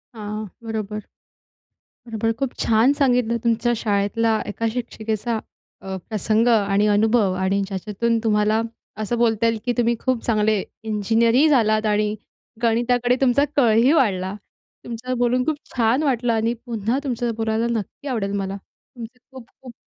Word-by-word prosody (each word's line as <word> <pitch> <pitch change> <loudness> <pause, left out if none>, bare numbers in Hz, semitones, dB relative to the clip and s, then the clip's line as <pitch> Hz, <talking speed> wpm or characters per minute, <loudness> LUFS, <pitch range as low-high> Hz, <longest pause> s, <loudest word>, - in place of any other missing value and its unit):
हां, 215 0 -5 0.2
बरोबर. 215 -2 -4 1.1
बरोबर. 225 0 -1
खूप 270 -1 -2
छान 230 +4 +4
सांगितलं 250 -5 +2
तुमच्या 235 +1 +1
शाळेतला 215 +1 +1
एका 210 +2 -4
शिक्षिकेचा 225 -1 -3 0.4
अ, 190 0 -5
प्रसंग 220 +1 +1
आणि 205 -3 +3
अनुभव 210 -1 +3
आणि 190 +1 +1
ज्याच्यातून 210 +4 -1
तुम्हाला 215 0 +2 0.4
असं 225 +3 -1
बोलता 230 -1 +2
येईल 230 -1 +2
की 245 - +1
तुम्ही 235 0 +2
खूप 255 -3 -1
चांगले 215 -2 +2 0.2
इंजिनिअरही 225 +5 +2
झालात 220 -6 +3
आणि 210 0 +1 0.5
गणिताकडे 245 +1 +2
तुमचा 270 +1 +4
कलंही 235 -1 +4
वाढला. 190 - +1 0.5
तुमच्यांशी 245 +2 -4
बोलून 245 +1 +2
खूप 315 - 0 0.2
छान 240 +4 +2
वाटलं 245 -4 +1
आणि 225 +1 +1
पुन्हा 230 +1 -1
तुमच्यांशी 240 -4 -2
बोलायला 225 +1 0
नक्की 215 +7 -9
आवडेल 220 -7 -2
मला. 195 0 -3 0.4
तुमचं 240 +1 -10
खूप-खूप 255 -1 -13
225 Hz, 135 wpm, -22 LUFS, 215-245 Hz, 1.1 s, छान